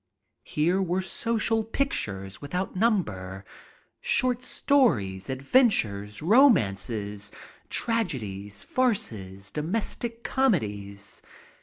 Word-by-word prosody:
Here 175 +6 +1
were 185 0 0
social 225 +2 0
pictures 100 - -2
without 180 +7 -3
number, 100 - 0 0.5
short 250 -2 +1
stories, 125 - +2
adventures, 130 - +2
romances, 105 - +3 0.4
tragedies, 105 - -2
farces, 100 - -1
domestic 225 - -2
comedies. 105 - -1
150 Hz, 70 wpm, -27 LUFS, -, 0.5 s, romances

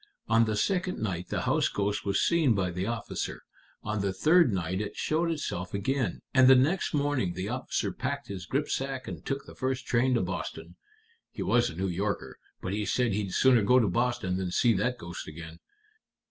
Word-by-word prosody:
On 115 0 +4
the 110 -1 -1
second 185 - 0
night 90 -5 -3
the - - -1
house - - +2
ghost 100 0 -2
was 100 -1 +1
seen 155 -9 +3
by 95 -2 0
the 90 +3 -3
officer; 115 -2 -4 0.4
on 105 -1 -2
the 100 -1 0
third 155 - +4
night 95 0 -1
it 105 - -5
showed 165 +2 0
itself 100 - -3
again; 130 +6 -1
and 130 -1 +6
the 130 - +9
next 155 +9 +2
morning 140 -11 0
the 95 +3 -3
officer 125 +2 -2
packed - - -4
his 90 -4 -7
gripsack 135 -2 -2
and - - -7
took 135 0 -3
the - - -12
first 130 0 -2
train 125 +2 +2
to - - +2
Boston. - - -5 0.5
He - - -5
was 120 0 +3
a 80 - -9
New 95 +3 -2
Yorker, 90 -7 -3 0.2
but 95 - -2
he 105 +1 -1
said 120 +1 +1
he'd 100 -2 -2
sooner 130 -3 +5
go 125 +5 +4
to 115 -4 +4
Boston 95 -3 0
than 95 -1 -2
see 115 +6 +3
that 125 +5 0
ghost 85 -6 -7
again. 80 +1 -9
110 Hz, 200 wpm, -28 LUFS, 95-130 Hz, 0.5 s, the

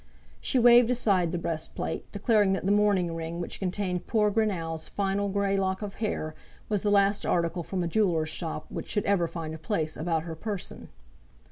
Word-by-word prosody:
She - - +1
waved 240 -1 +7
aside 195 -8 +2
the 175 - -1
breast 165 -2 -4
plate, - - -4
declaring 205 -1 +3
that 190 - -2
the 195 - +2
mourning 200 -4 +3
ring 165 +1 -4
which 175 - -4
contained 180 -1 -2
poor 210 -2 +2
Greenow's 170 -7 -1
final 200 0 -1
grey 200 0 +1
lock 190 +1 -1
of 200 -1 -5
hair, 155 -7 -2 0.4
was 205 -3 0
the 210 - +1
last 200 0 +3
article 170 0 0
from 180 +2 -3
a - - -1
jeweller's 170 -4 +1
shop 160 -1 -4
which - - -6
should 205 - 0
ever 185 -4 +2
find 165 -2 -5
a 160 - -7
place 160 -2 -2
about 160 0 -1
her 165 -1 -6
person. 200 +2 -5
190 Hz, 195 wpm, -28 LUFS, 165-205 Hz, 0.4 s, waved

